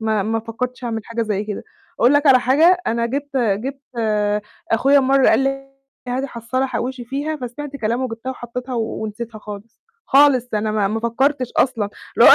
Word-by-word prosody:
ما 220 -2 +1
ما 225 +2 -1
فكرتش 250 +3 -5
أعمل 225 -2 -2
حاجة 230 0 -2
زي 210 -2 -1
كده. 210 -1 -5 0.4
أقول 245 +3 +6
لك 290 +1 +3
على 255 -2 +7
حاجة، 320 +9 +5
أنا 235 +1 +1
جِبت 280 +2 -4
جِبت 250 +4 -1 0.9
أخويا 275 +5 +5
مرة 270 0 +4
قال - - +5
لي: 270 0 -2 0.4
"هاتي 260 +3 -1
حصّالة 250 +2 -2
حوِّشي 255 0 -3
فيها." 285 +6 -3
فسمعت 280 +2 -6
كلامه 240 +2 -1
جِبتها 225 +3 -5
وحطيتها 250 0 -6
ونسيتها 220 0 -4
خالص، 210 +1 -10 0.3
خالص، 270 -3 +5
أنا 215 +1 0
ما 210 -2 +1
ما 220 +2 -2
فكرتش 255 +3 0
أصلًا. 225 -5 +2 0.3
اللي - - +9
هو - - +11
245 Hz, 175 wpm, -20 LUFS, 225-270 Hz, 0.9 s, هو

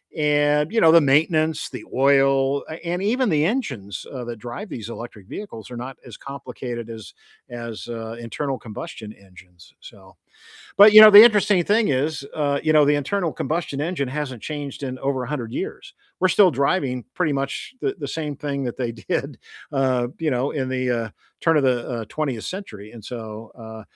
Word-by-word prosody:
and, 150 0 +2
you 225 - +2
know, 160 - +6
the 165 -1 +7
maintenance, 155 +3 +2
the 125 -4 -7
oil, 135 0 +3
a - - -5
and 175 +2 -2
even 240 +3 +1
the 155 -1 +2
engines, 115 - -3
uh, 125 -2 -5
that 120 0 -5
drive 120 - -7
these 115 -2 -7
electric 115 -4 -9
vehicles 130 - -8
are 120 - -6
not 125 +2 -7
as 120 - -11
complicated 125 -4 -7
as 110 -2 -9 0.4
as, 115 -2 -7
uh, 115 -1 -6
internal 130 +3 -4
combustion 115 -1 -8
engines, 90 -3 -19
so, 95 -2 -15 0.6
but, 210 +1 +9
you 215 - +12
know, 215 - +11
the 205 +1 +11
interesting 210 -5 +5
thing 210 +1 +2
is, 140 +1 -1
uh, 145 -2 0
you 155 - +2
know, 150 -1 +6
the 145 - +4
internal 165 +3 -1
combustion 150 0 -3
engine 155 -4 -2
hasn't 130 -4 -5
changed 145 -2 -6
in 130 -1 -4
over 135 -2 -1
100 125 -4 -4
years. - - -6 0.3
We're 185 - +4
still 190 0 +5
driving 135 -3 0
pretty 160 -5 0
much 135 - -4
the 400 -1 0
the - - -5
same 150 -3 -4
thing 140 -1 -3
that 120 - -4
they 120 -2 -2
did, 110 -4 -4 0.3
uh, 130 -3 +1
you 160 -2 0
know, 130 +2 0
in 130 -3 -2
the, 130 -1 -1
uh 115 -2 -1 0.3
turn 165 -2 +3
of 145 - +2
the, 125 -2 +1
uh, 115 -2 -3
20th 135 -8 -3
century, 110 - -8
and, 115 -3 -12
so, 110 -2 -8
uh, 110 -1 -9
135 Hz, 190 wpm, -22 LUFS, 120-155 Hz, 0.6 s, you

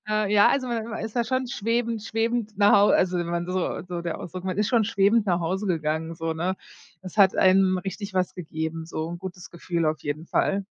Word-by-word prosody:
Äh, 215 -1 0
ja, 205 -1 +6
also 270 -2 +1
man 230 -2 -2
man 225 -1 -5
ist 220 +2 -7
da 240 - +2
schon 255 +2 -1
schwebend 230 0 -1
schwebend 225 -1 -2
nach 205 0 +5
Hau 205 0 +6
äh, - - +5
also 180 -1 +2
wenn 175 - -2
man 170 0 -2
so 185 0 -2
so 175 -1 -4
der 170 -1 -3
Ausdruck 180 +1 -7
man 185 0 -3
ist 210 0 +2
schon 235 -4 +3
schwebend 205 +1 +2
nach 175 -2 +1
Hause 190 +5 -2
gegangen, 160 -2 -1
so, 165 0 -3
ne? 180 +4 -2 0.5
Es 185 0 -9
hat 195 -3 +5
einem 185 0 +4
richtig 195 +1 -6
was 185 -1 0
gegeben, 160 -1 -4
so 160 -1 -4
'n 170 0 -6
gutes 180 -1 -8
Gefühl 170 -1 -2
auf 155 0 -1
jeden 150 +3 -4
Fall. 195 +3 0
190 Hz, 235 wpm, -25 LUFS, 170-215 Hz, 0.5 s, ja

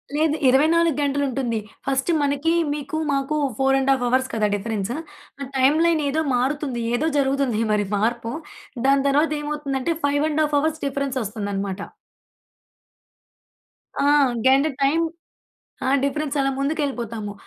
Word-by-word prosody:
లేదు. 310 0 +2
24 315 +4 +4
గంటలుంటుంది. 275 -4 -1 0.3
ఫస్ట్ 270 +3 0
మనకి 285 +3 +1 0.2
మీకు 295 +2 -4 0.2
మాకు 275 +2 -1 0.2
4½ 270 -1 +2
అవర్స్ 260 +2 +1
కదా 215 -2 +1
డిఫరెన్స్ 205 0 -3 0.5
ఆ - - -3
టైమ్‌లై‌న్ 310 +5 +3
ఏదో 310 +3 0
మారుతుంది. 265 0 -1
ఏదో 305 +6 0
జరుగుతుంది 270 -5 +1
మరి 205 -1 +1
మార్పు 230 +2 -1 0.6
దాని 275 0 +4
తర్వాతేమవుతుందంటే, 295 0 0
5½ 295 +1 +1
అవర్స్ 315 +1 -1
డిఫరెన్సొస్తుందనమాట. 210 -8 -3 2.2
ఆ! - - +2 0.4
గంట 270 +2 +5 0.2
టైమ్ 295 +5 +3 0.8
ఆ! - - +1
డిఫరెన్సలా 280 -1 0
ముందుకెళ్ళిపోతాము. 245 -7 -2
275 Hz, 105 wpm, -22 LUFS, 245-295 Hz, 2.2 s, గంట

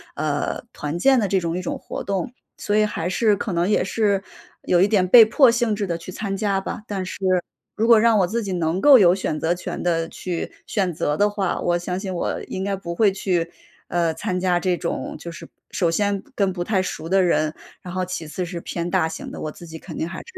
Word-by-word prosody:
呃， 150 -2 -2
团 150 +2 -4
建 265 +6 +5
的 210 - +1
这 195 0 +2
种 170 -1 -2
一 - - -2
种 180 - -3
活 - - -6
动， 195 +1 -2 0.3
所 205 0 0
以 215 - +4
还 175 -5 -3
是 210 +3 +3
可 200 - -4
能 170 0 +1
也 210 - +2
是 200 -1 0 0.4
有 175 - +2
一 195 - +5
点 200 -3 +3
被 225 +4 +9
迫 260 +4 +5
性 235 -2 +1
质 205 -1 -2
地 170 -2 -2
去 170 +2 -9
参 195 +1 -3
加 200 -2 0
吧。 210 - -6
但 195 -2 -3
是 - - -6 0.6
如 220 +2 +1
果 230 -2 +7
让 225 -1 +4
我 185 - +3
自 230 +5 -2
己 195 -2 -3
能 170 0 0
够 275 +2 +8
有 180 -3 +6
选 155 -5 -2
择 165 +3 +1
权 175 - -5
地 165 -2 0
去 175 0 -5 0.2
选 190 -4 0
择 150 -1 -1
的 205 - +4
话， 205 -3 -1
我 175 0 +1
相 180 +1 -3
信 190 -1 -4
我 175 - -2
应 190 - -5
该 200 0 -1
不 175 -3 -6
会 210 +1 +4
去， 175 -3 -1 0.4
呃， 170 -2 0
参 185 +1 -2
加 180 -1 +2
这 180 -1 0
种 170 - -4
就 170 - -7
是 170 - -11 0.2
首 175 - +1
先 200 +3 0
跟 195 -2 +1
不 175 -1 -3
太 190 0 +1
熟 165 -3 -5
的 190 +1 +4
人， 155 -3 +1 0.3
然 180 - -8
后 185 0 -1
其 180 -3 -5
次 180 +4 -4
是 175 -1 -6
偏 170 +1 -4
大 180 -4 +2
型 160 - -7
的， - - -8
我 155 - -3
自 175 - -12
己 160 -1 -9
肯 160 -2 -9
定 160 - -2
还 170 - -6
是 - - -10
185 Hz, 265 characters per minute, -22 LUFS, 170-205 Hz, 0.6 s, 被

